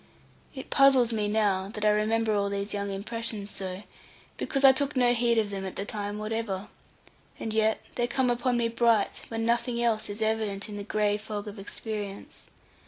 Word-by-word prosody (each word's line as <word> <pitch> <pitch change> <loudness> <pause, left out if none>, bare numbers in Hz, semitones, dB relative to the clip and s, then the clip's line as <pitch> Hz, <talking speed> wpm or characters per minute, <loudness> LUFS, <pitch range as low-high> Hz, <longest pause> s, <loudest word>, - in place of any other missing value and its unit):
It 265 - -8
puzzles 265 -4 +5
me 210 -2 +1
now, 205 -3 +1
that 210 0 -4
I 210 - +6
remember 215 +1 +1
all 200 -1 +1
those 200 +1 -3
young 200 0 -2
impressions 210 +1 -4
so, 190 +1 -5 0.5
because 275 -1 +1
I 270 - +11
took 280 +2 0
no 245 -1 +4
heed 235 -1 +2
of 215 -2 +1
them 195 -1 -4
at 190 - -5
the 200 - -3
time 205 -1 -4
whatever; 215 -2 -3 0.7
and 220 - -3
yet 220 0 +2
they 240 -1 0
come 250 0 +1
upon 245 +1 +1
me 235 -1 +2
bright, 230 -2 +2
when 225 0 -3
nothing 235 +1 +1
else 230 -3 +1
is 205 +2 -3
evident 215 -2 -1
in 210 - -7
the 205 - -5
gray 210 0 +1
fog 210 -1 -6
of 205 0 -7
experience. 205 0 -6
215 Hz, 190 wpm, -28 LUFS, 205-235 Hz, 0.7 s, I